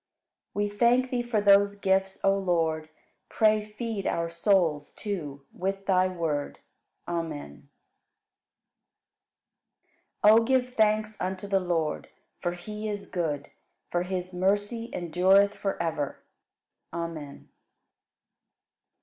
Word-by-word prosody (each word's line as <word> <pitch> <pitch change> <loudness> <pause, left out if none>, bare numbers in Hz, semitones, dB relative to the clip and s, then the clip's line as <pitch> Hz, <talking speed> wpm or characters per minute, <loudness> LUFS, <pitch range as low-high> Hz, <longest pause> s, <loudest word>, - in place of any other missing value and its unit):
53. 205 - 0
We - - +1
thank 245 +2 +4
Thee 245 -1 +1
for 240 -3 0
those 200 0 +5
gifts, 190 -1 +1
O 195 0 +4
Lord; 165 -5 0 0.4
Pray 215 -1 +3
feed 215 -1 -4
our 170 0 -1
souls, 170 -4 +1
too, 150 -10 -5
with 195 +1 -3
Thy 185 -1 +3
Word. 165 -5 -2 0.5
Amen. 160 - -5 2.5
54. 210 - +9
O - - 0
give 250 0 +1
thanks 215 -1 +1
unto 185 +1 -3
the 195 -1 +2
Lord, 170 -4 -1 0.3
for 175 -1 -1
He 210 +4 -6
is 205 -1 -6
good; 155 -6 -2 0.4
for 175 - +1
His 180 0 -4
mercy 205 +5 0
endureth 185 +4 +3
forever. 165 -8 -3 0.7
Amen. 165 -4 -6
190 Hz, 110 wpm, -27 LUFS, 170-210 Hz, 2.5 s, 54